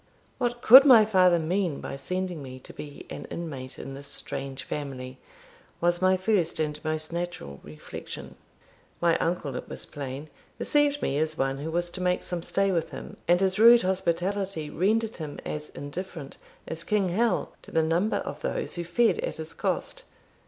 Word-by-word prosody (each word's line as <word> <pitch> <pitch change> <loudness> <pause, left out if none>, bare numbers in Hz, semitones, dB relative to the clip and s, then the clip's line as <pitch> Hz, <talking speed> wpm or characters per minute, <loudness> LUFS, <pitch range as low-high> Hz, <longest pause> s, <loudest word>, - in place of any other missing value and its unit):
"What 240 0 -1
could 260 +4 +11
my 245 -6 +8
father 185 -4 +5
mean 170 -1 0
by - - -5
sending 180 +3 -3
me 130 -1 -8
to - - -12
be 145 -1 -9
an - - -6
inmate 140 -6 -6
in 135 - -7
this 140 +1 -7
strange 135 -1 -4
family?" 130 -3 -6 0.6
was 175 +1 +1
my 185 0 +4
first 185 -4 +1
and 150 -1 -2
most 155 +1 -1
natural 170 - -4
reflection. 75 +1 -9 0.7
My 170 -1 +3
uncle, 165 -5 -1
it - - -6
was - - -4
plain, 140 +1 -7 0.3
received 290 -1 +2
me 140 - 0
as 155 0 0
one 135 0 0
who 155 +3 -4
was 175 +1 -1
to 185 - -6
make 180 0 +1
some 175 -1 -2
stay 195 +3 +1
with 165 -3 0
him, - - -8
and 175 +1 +5
his 190 +1 +1
rude 235 +1 +8
hospitality 185 -2 -1
rendered 220 +6 +1
him 155 -4 -6
as 150 0 -4
indifferent 155 0 -7 0.3
as 165 0 -4
King 200 -2 +1
Hal 225 +6 +1
to - - -14
the 160 - +2
number 170 +7 +1
of - - -5
those - - -2
who 175 - -3
fed 225 - +2
at - - -2
his - - -7
cost. - - -2
170 Hz, 180 wpm, -27 LUFS, 150-195 Hz, 0.7 s, could